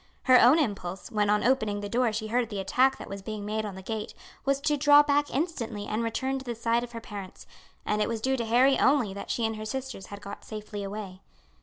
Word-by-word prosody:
Her 255 -1 +7
own 255 +6 +7
impulse, 195 - -2
when 210 -2 +1
on 210 0 +3
opening 220 -5 +1
the 205 - -4
door 240 +2 +1
she 220 +1 -3
heard 240 0 +1
the 205 -3 -4
attack 255 +8 +2
that - - -9
was 195 0 -7
being 210 +1 -6
made 215 +1 -2
on 200 - -7
the 190 - -9
gate, 220 +1 -5 0.3
was 275 0 +2
to 300 +1 +2
draw 290 0 +7
back 290 0 +2
instantly 250 - -3
and 215 +2 -2
return 260 +4 -1
to - - -9
the 240 -2 -4
side 230 +1 +1
of 240 0 -8
her 230 - -5
parents, 200 -4 -9 0.4
and 210 0 0
it 210 - +1
was 230 -1 -2
due 265 +4 +1
to 235 -3 -2
Harry 250 +4 +4
only 265 -8 +3
that 200 - -8
she 235 - 0
and 220 0 -2
her 215 - -6
sisters 260 -4 -5
had 200 - -8
got 200 0 -9
safely 210 -1 -6
away. 195 -2 -7
225 Hz, 250 wpm, -28 LUFS, 205-260 Hz, 0.4 s, Her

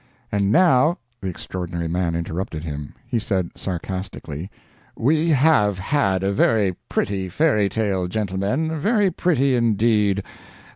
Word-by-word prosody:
And 100 -1 +1
now 165 +1 +4
" 115 0 -43
The 95 - -4
Extraordinary 85 -1 -5
Man 85 0 -1
interrupted 85 -1 -4
him. 75 -2 -6
He 115 - -1
said, 95 -5 -1
sarcastically, 95 -2 -5 0.5
"We 155 +7 +2
have 130 - +4
had 95 -3 +1
a 100 +1 +1
very 100 -2 +2
pretty 95 -2 -1
fairy 105 - +2
tale, 95 -3 -1
gentlemen 105 - -1
very 205 +2 +2
pretty 140 -8 +2
indeed. 105 -3 +2
100 Hz, 130 wpm, -22 LUFS, 95-130 Hz, 0.5 s, now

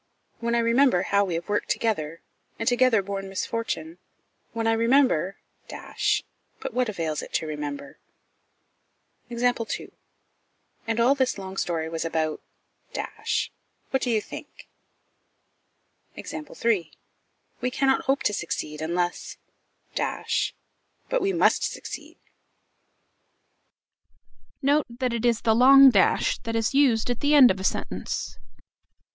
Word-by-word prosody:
When 235 0 0
I - - +3
remember 235 -4 +3
how 200 0 +2
we 180 -3 -3
have 170 +1 -4
worked 205 0 -1
together, 165 -8 -1 0.4
and 225 - -4
together 245 -4 +4
borne 195 0 -5
misfortune; 185 -5 -4 0.5
when 230 -1 -3
I 225 - +3
remember 230 - +2 0.3
but - - -4
what 250 -2 +1
avails 165 -6 -2
it - - -10
to - - 0
remember? 145 -2 -6 1.3
And 235 -1 -6 1.6
all 245 +4 +5
this 260 -4 0
long 190 -1 -7
story 165 -4 -2
was 165 0 -3
about 160 -1 -2 1.5
what 265 - +1
do 250 - -1
you 220 -2 +2
think? - - -11 1.5
"We 235 - -4
cannot 265 +1 +1
hope 270 +1 +1
to 210 - +1
succeed, 155 -4 -4
unless 175 +2 -2 0.3
" - - -39
"But - - -3
we 390 - +1
must 345 - +3
succeed." - - -6 2.5
Note 285 +2 +3
that 245 +1 -2
it 235 0 -2
is 235 -1 +1
the 225 - +3
long 270 +3 +8
dash 195 -5 +2
that 230 0 -4
is 225 +3 0
used 250 -5 +3
at 245 - -3
the 290 +1 +3
end 265 -4 +8
of 190 - -3
a - - -5
sentence. 185 - -3
225 Hz, 120 wpm, -25 LUFS, 175-255 Hz, 2.5 s, long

